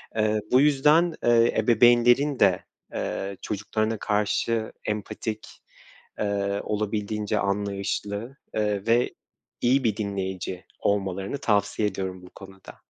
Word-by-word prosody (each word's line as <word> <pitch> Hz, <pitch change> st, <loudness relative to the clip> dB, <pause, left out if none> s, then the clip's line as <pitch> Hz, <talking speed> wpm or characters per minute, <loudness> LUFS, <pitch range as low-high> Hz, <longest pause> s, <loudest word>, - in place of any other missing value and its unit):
Eee, 110 Hz, -1 st, +2 dB
bu 130 Hz, +2 st, +6 dB
yüzden, 150 Hz, +4 st, +4 dB
eee, 120 Hz, 0 st, +4 dB
ebeveynlerin 120 Hz, +4 st, +4 dB
de, 95 Hz, -3 st, +3 dB, 0.3 s
eee, 100 Hz, -1 st, -3 dB
çocuklarına 110 Hz, +2 st, -2 dB
karşı 110 Hz, +2 st, 0 dB
empatik, 105 Hz, +1 st, -4 dB, 0.7 s
eee, 100 Hz, -1 st, -1 dB
olabildiğince 105 Hz, 0 st, -2 dB
anlayışlı, 100 Hz, +4 st, -2 dB, 0.2 s
eee, 105 Hz, -1 st, -1 dB
ve 120 Hz, +2 st, +2 dB, 0.5 s
iyi 130 Hz, +2 st, +3 dB
bir 110 Hz, -2 st, +1 dB
dinleyici 95 Hz, -3 st, -4 dB, 0.2 s
olmalarını 95 Hz, +4 st, -1 dB
tavsiye 105 Hz, -3 st, +1 dB
ediyorum 95 Hz, -2 st, -5 dB
bu 90 Hz, -, -13 dB
konuda. 95 Hz, -1 st, -13 dB
105 Hz, 105 wpm, -25 LUFS, 100-115 Hz, 0.7 s, bu